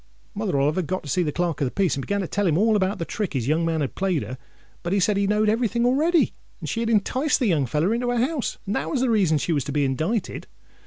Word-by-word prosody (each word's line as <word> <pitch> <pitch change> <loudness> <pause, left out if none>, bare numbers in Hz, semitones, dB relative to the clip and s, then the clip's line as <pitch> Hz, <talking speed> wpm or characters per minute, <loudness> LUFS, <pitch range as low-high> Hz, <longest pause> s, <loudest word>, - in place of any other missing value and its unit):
Mother 200 -9 -1
Oliver 150 +6 +1
got 185 +2 -3
to 145 - -8
see 180 - +1
the 155 -4 0
Clerk 170 -2 -2
of - - +3
the - - 0
Peace, 190 +4 0
and 140 - -3
began 200 +8 -1
to 185 - -3
tell 205 +2 0
him 160 -2 +2
all 220 +3 +3
about 195 0 +1
the 165 - -3
trick 205 +1 -3
his 130 -4 -2
young 160 +3 +2
man 165 -1 0
had 140 - -2
played 185 -6 0
her; 130 0 -7 0.4
but 175 +2 -2
he 200 - +2
said 200 +2 +2
he 200 0 +1
knowed 210 +1 +2
every 225 +3 +2
thing 235 +2 0
already, 310 +7 +3 0.3
that - - -7
she 230 - -2
had 230 -1 -1
enticed 255 +7 +1
the 255 - +1
young 155 - +2
feller 155 - +1
into 245 +1 -1
her 245 - 0
house, 265 +3 -1
and 200 - -2
that - - -2
was 270 - -1
the 255 -2 +2
reason 185 -8 +3
she 165 +4 -1
was 145 -4 0
to 145 - -4
be 145 0 +1
indicted. 160 - -2
195 Hz, 295 wpm, -24 LUFS, 155-225 Hz, 0.4 s, of